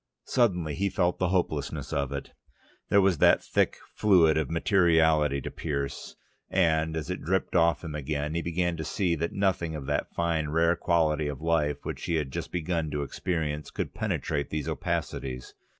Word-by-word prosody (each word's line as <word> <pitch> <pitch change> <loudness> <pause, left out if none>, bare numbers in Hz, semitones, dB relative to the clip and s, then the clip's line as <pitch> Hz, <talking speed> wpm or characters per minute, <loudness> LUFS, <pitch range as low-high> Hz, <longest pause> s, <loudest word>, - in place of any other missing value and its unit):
Suddenly 90 - +1
he 100 +6 0
felt 90 -1 0
the 90 - +2
hopelessness 80 -6 -1
of 70 -1 -1
it. 70 0 -5 0.6
There 100 - +5
was 95 -5 +2
that - - +5
thick - - +1 0.2
fluid 90 -7 +4
of 80 -3 0
materiality 80 -5 +3
to - - -6
pierce, 70 -3 -4 0.3
and, 80 -3 +2
as 80 +3 -4
it 90 - -4
dripped 95 +4 -1
off 85 0 +3
him 80 -3 -5
again, 75 +1 -3
he 85 - -1
began 85 +1 -1
to 80 - -3
see 90 +1 0
that 85 +2 -2
nothing 95 -5 0
of 75 -3 -6
that - - -1
fine 80 -3 0
rare 85 +2 +3
quality 80 -4 +1
of 70 -3 -4
life 75 -3 0
which - - -5
he 85 - 0
had 75 -4 -1
just - - -5
begun 85 -2 -1
to 75 -1 -2
experience, 75 0 -3
could - - -4
penetrate 70 0 -2
these 75 -2 -3
opacities. 65 -2 -3
80 Hz, 180 wpm, -28 LUFS, 75-85 Hz, 0.6 s, There